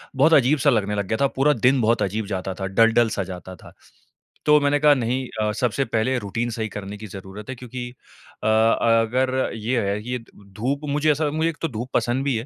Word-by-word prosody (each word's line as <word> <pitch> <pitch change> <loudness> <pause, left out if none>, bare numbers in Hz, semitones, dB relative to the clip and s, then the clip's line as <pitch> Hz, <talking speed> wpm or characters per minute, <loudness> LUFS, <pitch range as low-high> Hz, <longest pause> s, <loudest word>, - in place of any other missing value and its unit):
बहुत 155 +5 +4
अजीब-सा 145 +1 +4
लगने 105 -5 +1
लग 100 -2 -2
गया 110 - -1
था, 140 - +4
पूरा 140 +2 +2
दिन 125 +2 +2
बहुत 115 +1 +2
अजीब 105 +3 -2
जाता 95 -1 -3
था, 95 0 -5
डल 115 +4 +4
डल 120 -1 +3
सा 100 - -2
जाता 95 0 -8
था। - - -15 0.7
तो 150 0 +6
मैंने 145 0 +2
कहा 150 0 +6
नहीं 125 0 -1
अ, 105 0 +1
सबसे 125 +4 -1
पहले 115 +3 0
रूटीन 115 +3 -3
सही 110 -1 -3
करने 100 0 -7
की 105 +1 -9
ज़रुरत 95 +3 -10
है, 130 - -4
क्योंकि 125 0 -7 0.5
अ, - - 0
अगर 115 +3 +2
ये 115 +2 -1
है 100 +1 -2
कि 120 - -9
ये 125 - 0
द 115 -3 -19
धूप 130 +6 -1
मुझे 150 +2 +2
ऐसा 150 +1 0
मुझे 160 +2 0
एक 165 - -6
तो 165 - 0
धूप 120 -2 -6
पसंद 125 +3 0
भी 140 -3 +1
है। 115 - -5
120 Hz, 230 wpm, -23 LUFS, 105-135 Hz, 0.7 s, तो